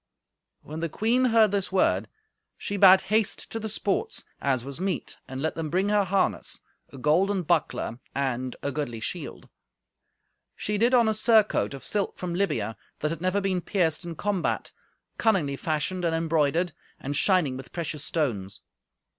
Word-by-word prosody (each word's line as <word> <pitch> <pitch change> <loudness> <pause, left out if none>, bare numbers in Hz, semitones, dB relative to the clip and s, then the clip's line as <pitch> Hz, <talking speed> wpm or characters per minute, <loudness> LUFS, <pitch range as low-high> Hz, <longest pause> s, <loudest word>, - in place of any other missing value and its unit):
When 155 +2 -7
the 165 0 -2
queen 235 - +2
heard 225 -4 +5
this 200 -1 -1
word, 190 - +2 0.5
she 205 - -3
bade 190 -1 +8
haste 215 0 0
to 225 - -3
the 220 0 -4
sports, 215 - -2 0.2
as 130 -3 0
was 140 +2 -7
meet, 190 0 -2
and 135 +1 -5
let 160 - 0
them 160 -2 -4
bring 190 +5 +1
her 205 -1 +3
harness, 190 +1 0 0.3
a - - -10
golden 180 +8 +2
buckler 155 -7 0 0.2
and 130 -2 -1
a 140 - -1
goodly 130 -5 -3
shield. 110 - -6 1.1
She 210 0 -2
did 240 +3 +4
on 235 -2 +5
a 220 - +3
surcoat 215 - +3
of 135 - -10
silk 205 -2 0
from 180 -1 -4
Libya, 140 - -1 0.2
that 150 - 0
had 165 -1 -5
never 185 +2 +1
been 190 -2 0
pierced 170 -4 0
in 170 -1 -6
combat, 200 0 -1 0.5
cunningly 180 -11 +2
fashioned 160 +5 -2
and 165 -1 +1
embroidered, 165 +1 +1 0.3
and 145 +2 -4
shining 165 -4 +3
with 130 0 -9
precious 155 -4 -3
stones. 105 - -1
175 Hz, 165 wpm, -26 LUFS, 145-200 Hz, 1.1 s, bade